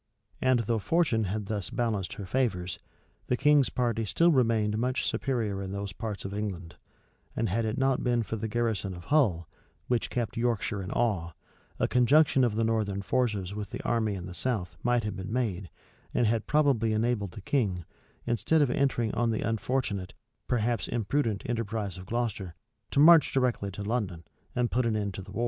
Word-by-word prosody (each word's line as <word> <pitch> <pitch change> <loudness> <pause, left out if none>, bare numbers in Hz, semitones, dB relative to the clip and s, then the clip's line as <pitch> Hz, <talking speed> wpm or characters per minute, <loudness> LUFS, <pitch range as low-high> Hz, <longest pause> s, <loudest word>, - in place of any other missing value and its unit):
And 130 -2 +3
though 115 0 0
fortune 120 - +1
had 105 +2 -3
thus 105 -2 -3
balanced 110 -6 -1
her 100 - -7
favors, 90 -7 -1 0.5
the 125 - +1
king's 145 0 +4
party 120 -2 0
still 165 - +3
remained 115 -6 +2
much 125 +2 0
superior 110 -7 -1
in 95 0 -5
those 100 -1 -4
parts 105 -2 -5
of 100 - -4
England; 90 -5 -4 0.6
and 115 -2 0
had 115 +5 0
it 110 +3 -2
not 135 -1 +1
been 120 -1 +2
for 110 - -4
the 110 0 -3
garrison 110 -4 -1
of 85 - -10
Hull, 95 - +3 0.4
which 120 +1 0
kept 120 -3 -3
Yorkshire 115 -3 0
in 95 - -6
awe, 100 -9 0 0.4
a - - +1
conjunction 135 +2 +4
of 115 -4 +1
the 115 - +1
northern 105 -3 0
forces 105 -5 0
with 105 -1 -5
the - - -6
army 110 -3 0
in 90 -2 -6
the 90 - -7
south 90 -6 -2
might 120 -1 +2
have 105 -2 -3
been 95 +2 -6
made, 105 -7 -1 0.5
and 120 - +3
had 110 0 0
probably 135 -7 +3
enabled 110 -4 0
the 105 - -9
king, 95 - 0 0.4
instead 145 +7 +2
of 130 - +1
entering 125 -5 +1
on 120 0 +1
the 110 - -1
unfortunate, 110 -4 -2 0.3
perhaps 120 -1 0
imprudent, 115 -2 -1
enterprise 110 -5 -3
of 90 - -10
Gloucester, 110 -7 -2 0.3
to - - 0
march 160 0 +7
directly 125 -6 +1
to 100 +1 -6
London, 100 -7 -2 0.3
and 125 -1 +1
put 125 -1 +1
an 110 - +1
end 100 -2 -2
to 95 - -6
the 95 +1 -11
war. 110 - -5
110 Hz, 190 wpm, -29 LUFS, 100-120 Hz, 0.6 s, march